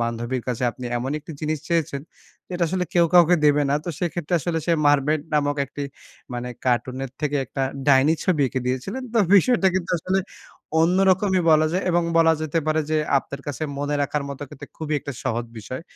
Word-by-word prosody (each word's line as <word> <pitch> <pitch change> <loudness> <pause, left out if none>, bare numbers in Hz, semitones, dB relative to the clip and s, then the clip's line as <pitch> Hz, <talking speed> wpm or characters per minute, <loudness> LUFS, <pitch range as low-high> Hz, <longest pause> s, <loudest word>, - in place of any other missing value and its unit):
বান্ধবীর 120 +1 -2
কাছে 125 0 -2
আপনি 125 - -10
এমন 125 +3 -3
একটি 150 +2 -10
জিনিস 155 0 -1
চেয়েছেন। 160 -5 0 0.5
যেটা 180 -1 -3
আসলে 180 +1 -1
কেউ 175 -1 +5
কাউকে 175 0 +7
দেবে 145 0 +4
না। - - +3
তো - - -5
সেক্ষেত্রে 175 0 -2
আসলে 165 0 -1
সে 170 - +3
'Mermaid' 145 +1 +3
নামক 145 0 +1
একটি, 145 - -7 0.5
মানে 120 0 -4 0.2
কার্টুনের 130 +1 -1
থেকে 145 -1 0
একটা 135 +2 -4 0.3
ডাইনি 140 +3 +5
ছবি 170 -6 +2
এঁকে 130 - -3
দিয়েছিলেন। 130 - -3
তো 230 - +4 0.2
বিষয়টা 200 -1 +5
কিন্তু 180 -2 -2
আসলে 185 +4 0 0.6
অন্যরকমই 190 +2 +3
বলা 155 0 +5
যায় 185 +2 0
এবং 175 0 +2 0.2
বলা 165 0 +5
যেতে 155 +1 -1
পারে 155 0 +2
যে, 155 - +2 0.2
আপনার 140 +1 -8
কাছে 145 +1 -4 0.2
মনে 145 +1 -1
রাখার 145 +1 -1
মতো 140 +1 -6
কিন্তু - - -10
খুবই 155 -1 -3
একটা 140 - -6
সহজ 120 -2 -1
বিষয়। 130 +7 -7
150 Hz, 190 wpm, -23 LUFS, 135-175 Hz, 0.6 s, কাউকে